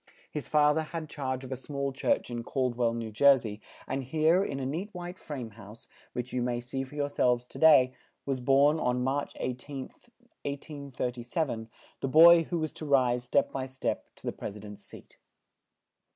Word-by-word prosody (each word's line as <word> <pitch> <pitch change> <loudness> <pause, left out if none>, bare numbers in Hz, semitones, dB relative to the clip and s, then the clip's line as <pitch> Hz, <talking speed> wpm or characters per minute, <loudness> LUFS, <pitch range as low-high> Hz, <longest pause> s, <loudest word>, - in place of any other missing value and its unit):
His 150 - -5
fa 150 -1 +4
ther 160 - 0
had 160 0 -6
charge 130 -2 -3
of 130 - -9
a - - -1
small 140 +1 -4
church 130 - 0
in 120 0 -3
Cald 130 0 -1
well, 115 -1 +1
New 115 -1 -4
Jer 140 +5 +6
sey, 110 -4 -6 0.3
and 135 +1 -2
here, 160 +7 +3
in 140 -8 -3
a 135 - -3
neat 170 +10 -3
white 175 +1 -7
frame 130 -7 -6
house, 105 +1 -13 0.3
which 125 +1 -4
you 125 - 0
may 120 0 -1
see 125 +2 -4
for 135 +2 -11
your 145 -1 0
selves 125 -3 +1
to - - -11
day, 140 -5 +7 0.3
was 135 -2 -1
born, 140 +4 +4
on 125 -2 0
March 135 +2 -1
18th, 130 - -6 0.3
1837, 135 -3 -4 0.3
the - - -2
boy 165 +4 +8
who 175 - -2
was 155 -1 -2
to 155 - -8
rise, 125 -3 +3
step 135 +3 +2
by 135 -1 -3
step, 130 0 -3
to - - -16
the - - -2
pres 100 - -6
i - - -11
dent's 105 -1 -10
seat. - - -15
135 Hz, 195 wpm, -29 LUFS, 125-150 Hz, 0.3 s, boy